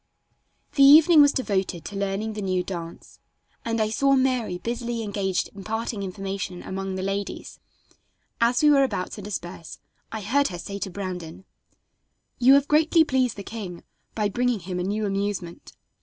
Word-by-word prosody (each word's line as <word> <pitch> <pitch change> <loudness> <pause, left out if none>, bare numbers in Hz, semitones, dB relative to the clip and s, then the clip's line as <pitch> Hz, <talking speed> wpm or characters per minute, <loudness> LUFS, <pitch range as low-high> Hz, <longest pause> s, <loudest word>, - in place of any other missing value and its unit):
The 280 - +1
evening 305 +3 +8
was 285 -1 +6
devoted 195 - -2
to 205 - -7
learning 200 +2 -2
the 210 - -5
new 185 -2 0
dance, 170 -2 -8 0.4
and 230 0 -1
I 215 -1 +1
saw 275 +4 +3
Mary 255 -8 +1
busily 235 +2 -3
engaged 195 -3 -2
imparting 220 +2 -4
information 195 -1 -5
among 190 0 -4
the 185 - -3
ladies. 195 +1 -4 0.8
As 240 +4 +3
we 300 - +7
were 280 -1 +5
about 200 -8 -2
to 210 - -7
disperse 175 -4 -7 0.3
I 220 - -4
heard 280 +8 +2
her 175 - -6
say 200 +3 -6
to 195 - -3
Brandon: 185 -2 -6 0.9
"You 260 +2 +7
have 280 0 +3
greatly 320 +2 +4
pleased 260 -6 0
the 200 - -6
king 195 -5 -7 0.3
by 215 -2 +1
bringing 245 0 0
him 180 +1 -4
a - - -1
new 210 +3 -1
amusement. 195 -3 -4
205 Hz, 165 wpm, -25 LUFS, 190-245 Hz, 0.9 s, evening